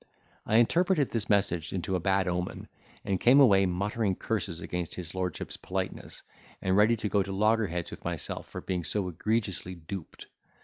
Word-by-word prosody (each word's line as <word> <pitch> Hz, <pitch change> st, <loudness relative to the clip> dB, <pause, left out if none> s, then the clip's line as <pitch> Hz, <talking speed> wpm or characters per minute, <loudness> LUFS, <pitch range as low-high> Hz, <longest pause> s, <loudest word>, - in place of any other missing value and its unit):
I 110 Hz, -, +1 dB
interpreted 165 Hz, +5 st, +3 dB
this 115 Hz, -3 st, -2 dB
message 95 Hz, -5 st, +1 dB
into 95 Hz, 0 st, -2 dB
a -, -, +1 dB
bad 95 Hz, +2 st, +1 dB
omen, 90 Hz, 0 st, -3 dB, 0.4 s
and 95 Hz, -2 st, 0 dB
came 130 Hz, +4 st, +6 dB
away 100 Hz, -8 st, +6 dB
muttering 100 Hz, +2 st, 0 dB
curses 100 Hz, -6 st, -2 dB
against 90 Hz, -1 st, -4 dB
his 85 Hz, -2 st, -4 dB
lordship's 90 Hz, -2 st, -2 dB
politeness, -, -, -5 dB, 0.4 s
and 95 Hz, 0 st, +1 dB
ready 105 Hz, +3 st, +5 dB
to 110 Hz, -, -2 dB
go 100 Hz, 0 st, +2 dB
to 95 Hz, 0 st, -3 dB
loggerheads 100 Hz, -4 st, +1 dB
with -, -, -9 dB
myself -, -, -4 dB
for -, -, -6 dB
being 90 Hz, -2 st, -2 dB
so 95 Hz, +3 st, -1 dB
egregiously 95 Hz, 0 st, -2 dB
duped. 85 Hz, +1 st, -8 dB
95 Hz, 170 wpm, -29 LUFS, 90-110 Hz, 0.4 s, came